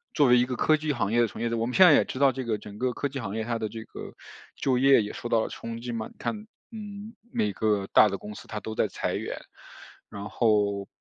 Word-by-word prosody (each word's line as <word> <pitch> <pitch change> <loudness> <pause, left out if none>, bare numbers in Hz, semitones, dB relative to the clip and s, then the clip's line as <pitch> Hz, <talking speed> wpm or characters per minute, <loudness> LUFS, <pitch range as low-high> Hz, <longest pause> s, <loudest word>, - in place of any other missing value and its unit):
作 145 - +5
为 125 - +6
一 125 - +3
个 125 - -3
科 155 - +3
技 155 0 -2
行 105 -6 -1
业 120 - +4
的 115 - +3
从 - - -10
业 115 - 0
者， - - 0
我 115 - 0
们 125 - -4
现 190 - +8
在 160 - +8
也 - - +5
知 - - -6
道 140 -1 +5
这 130 +1 -5
个 110 -2 0
整 105 0 -11
个 125 -1 0
科 145 - -2
技 135 - -5
行 105 -4 -5
业， 110 - -2
它 115 0 -2
的 110 - -2
这 110 +1 -7
个 - - -10 0.4
就 130 -2 +1
业 135 -4 +5
也 105 - -6
受 120 - -6
到 115 - +3
了 - - -3
冲 115 0 -7
击 120 - -5
嘛， 115 -2 -4
你 - - -19
看， 215 -1 -4 0.2
嗯， 210 0 -8 0.2
每 105 -2 0
个 105 -2 0
大 110 - +8
的 100 - -3
公 105 +2 -9
司 - - -11
它 105 - -5
都 110 - -6
在 - - +2
裁 - - -3
员， - - -4 0.7
然 100 0 -7
后 105 -3 +1
115 Hz, 305 characters per minute, -27 LUFS, 105-135 Hz, 0.7 s, 现